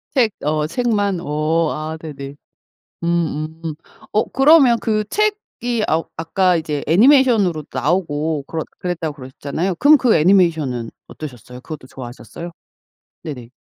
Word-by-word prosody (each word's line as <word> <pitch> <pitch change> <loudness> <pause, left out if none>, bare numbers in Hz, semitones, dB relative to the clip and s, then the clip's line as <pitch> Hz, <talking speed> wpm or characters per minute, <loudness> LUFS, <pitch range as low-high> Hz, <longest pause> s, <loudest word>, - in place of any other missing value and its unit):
책 235 -5 +4 0.2
어 150 0 +1
책만. 205 -3 0
어 155 +1 0
아 155 +1 -5
네네. 140 -3 -8 0.7
음 160 -2 -1
음. 160 -2 -3 0.4
어 215 - +2
그러면 270 -4 +6
그 215 -1 0
책이 405 - -1
아 160 +1 +2
아까 180 +2 +2
이제 150 -3 -3
애니메이션으로도 210 - +4
나오고 150 0 -1
그렀 160 -1 -3 0.2
그랬다고 170 -4 -3
그러셨잖아요. 145 +6 -4
그럼 295 - +6
그 245 -4 +3
애니메이션은 160 - +2 0.2
어떠셨어요? 125 -4 -9
그것도 150 -2 -9
좋아하셨어요? 130 +7 -9 0.7
네네. 125 -6 -7
165 Hz, 310 characters per minute, -19 LUFS, 150-205 Hz, 0.7 s, 그러면